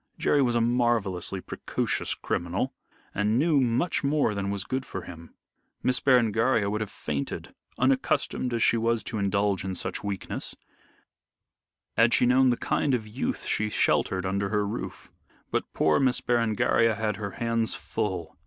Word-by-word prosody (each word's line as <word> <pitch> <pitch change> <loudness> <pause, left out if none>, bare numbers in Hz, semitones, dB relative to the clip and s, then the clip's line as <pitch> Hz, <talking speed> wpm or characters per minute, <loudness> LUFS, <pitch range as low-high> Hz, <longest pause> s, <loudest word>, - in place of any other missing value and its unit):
Jerry 145 - +2
was 120 -3 +2
a 120 - +3
marvellously 115 -6 0
precocious - - -2
criminal 90 +10 -2 0.4
and 105 +2 +1
knew 150 +1 +3
much 130 +9 +1
more 140 -5 +2
than 100 -1 -2
was 100 -1 -2
good 130 +5 -2
for 95 -7 -6
him. 85 -1 -11 0.5
Miss 125 0 +2
Berengaria 115 -4 +3
would 105 +1 -2
have 105 - -3
fainted 70 -7 -5 0.2
unaccustomed 130 0 +1
as 115 -2 +1
she 115 - +4
was 115 0 +1
to 110 - -4
indulge 100 -1 +1
in 95 -1 -3
such - - -3
weakness 100 -2 -4 1.4
had 115 +1 +5
she - - +3
known 130 +1 +5
the 120 - +2
kind 140 -3 +1
of 110 -3 -4
youth 110 +5 -3
she 105 0 0
sheltered 95 -2 +1
under 100 +1 -1
her 105 -1 +1
roof. 100 - -6 0.4
But - - -2
poor 80 - +2
Miss 130 -2 +2
Berengaria 115 -1 +2
had 105 0 -2
her 100 -3 -5
hands 115 -1 0
full. 95 -7 -4
110 Hz, 160 wpm, -27 LUFS, 100-125 Hz, 1.4 s, had